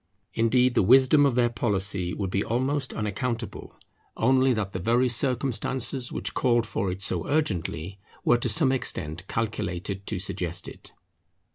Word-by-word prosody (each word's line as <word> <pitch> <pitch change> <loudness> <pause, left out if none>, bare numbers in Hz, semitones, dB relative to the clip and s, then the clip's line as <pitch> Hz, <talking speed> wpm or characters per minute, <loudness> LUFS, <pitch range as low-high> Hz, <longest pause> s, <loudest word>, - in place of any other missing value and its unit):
Indeed 125 +2 +3
the - - +3
wisdom 130 +7 +6
of 130 - -1
their 120 -1 +2
policy 100 -5 -1
would 95 -1 -3
be 100 +1 0
almost 130 +4 -1
unaccountable, 115 +2 -4 0.4
only 130 +2 +3
that 105 -5 -2
the 95 - -3
very 120 +7 +2
circumstances 125 0 -1
which - - -4
called 120 -3 +2
for 100 -3 -2
it 95 +2 -4
so - - -1
urgently, 95 - -2 0.3
were 120 - +5
to 120 - -1
some 130 +5 +3
extent 90 - -3
calculated 100 -3 -3
to 105 - -2
suggest 90 -1 -2
it. - - -11
115 Hz, 150 wpm, -26 LUFS, 95-130 Hz, 0.4 s, wisdom